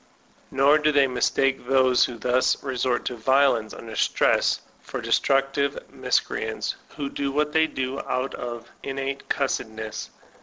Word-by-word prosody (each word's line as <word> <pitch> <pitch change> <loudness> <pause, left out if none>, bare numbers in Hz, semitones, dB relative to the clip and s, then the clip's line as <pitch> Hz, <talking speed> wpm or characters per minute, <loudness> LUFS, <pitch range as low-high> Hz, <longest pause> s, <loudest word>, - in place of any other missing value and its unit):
Nor 140 +3 +4
do 150 0 +3
they 140 -2 +5
mistake 135 0 0
those 130 -1 +4
who 120 - -6
thus 125 +2 +1
resort 130 -2 -1
to 125 - -2
violence 120 -2 +2
under 110 -1 -9
stress - - +2 0.2
for - - -6
destructive 135 +1 +1 0.2
miscreants - - -1 0.2
who 140 - -2
do 140 0 -3
what 150 +1 0
they 160 0 +4
do 130 -2 -3
out 130 +2 -2
of 120 -1 -6
innate 135 0 -4
cussedness. 110 -5 -3
135 Hz, 140 wpm, -25 LUFS, 125-140 Hz, 0.2 s, they